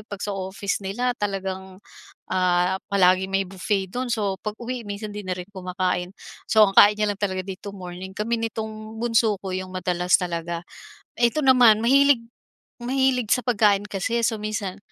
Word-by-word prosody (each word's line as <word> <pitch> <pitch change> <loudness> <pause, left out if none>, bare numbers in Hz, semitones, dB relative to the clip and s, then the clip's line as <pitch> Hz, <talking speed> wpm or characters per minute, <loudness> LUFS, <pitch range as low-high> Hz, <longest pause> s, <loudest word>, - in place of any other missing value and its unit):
'pag 200 -1 -7
sa 205 - -2
office 195 +2 -3
nila 245 +6 -1
talagang, 190 -2 -4 0.5
ah, 180 0 +2 0.2
palaging 190 0 +3
may 195 0 +1
buffet 195 0 -2
do'n. 245 +4 -3
So, 205 -4 0
'pag-uwi 235 +3 -5
minsan 205 +1 -5
'di 210 - -5
na 185 - -2
rin 180 +1 -7
kumakain. 180 -1 -2 0.3
So, 215 -2 +5
ang 195 - -4
kain 205 +1 +8
niya 210 - +2
lang 200 - -17
talaga 190 -2 -1
dito 195 +1 -7
morning, 185 0 -8
kami 230 +3 -1
nitong 220 0 -7
bunso 230 -2 +2
ko 190 - -5
'yong 185 0 -5
madalas 180 -1 +1
talaga. 170 -1 -3 0.6
Ito 245 +5 +2
naman 240 -4 +6
mahilig 275 -1 +5 0.6
mahilig 255 -3 +1
sa 250 - +3
pagkain 205 -4 +3
kasi, 225 +4 -1
so, 220 -1 0
minsan 210 -3 -3
200 Hz, 165 wpm, -24 LUFS, 185-225 Hz, 0.6 s, kain